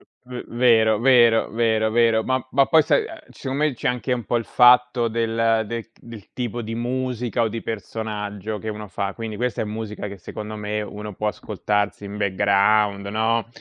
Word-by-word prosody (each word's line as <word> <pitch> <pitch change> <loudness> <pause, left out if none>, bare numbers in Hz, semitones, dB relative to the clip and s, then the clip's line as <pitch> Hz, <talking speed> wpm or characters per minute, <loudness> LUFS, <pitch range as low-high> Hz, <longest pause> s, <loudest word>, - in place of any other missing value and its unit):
V - - -25 0.2
v 125 0 -7
vero, 110 -3 +4
vero, 120 -3 +5
vero, 110 -1 +1
vero, 115 -1 +3
ma 130 -1 -1
ma 135 +1 +4
poi 160 -1 +5
sai, 435 - +2 0.2
secondo 135 +2 -3
me 155 -3 +2
c'è - - -3
anche 125 +1 -2
un 120 -2 0
po' 120 - -1
il 115 - -2
fatto 125 -1 +5
del 115 0 +1
del, 115 0 -5
del 115 -4 -13
tipo 120 -1 -3
di 110 +1 -5
musica 125 -1 -2
o - - +1
di 115 +1 -5
personaggio 105 -1 -5
che 110 - -8
uno 105 0 -6
fa, 100 +1 -3
quindi 110 -1 -6
questa 125 0 -1
è - - 0
musica 105 -1 -5
che 100 0 -8
secondo 105 +4 -7
me 105 0 -3
uno 105 0 -7
può 105 +3 -2
ascoltarsi 105 0 -2
in 100 +1 -7
background, 100 +1 +2
no. 110 +2 0
110 Hz, 190 wpm, -22 LUFS, 105-120 Hz, 0.2 s, vero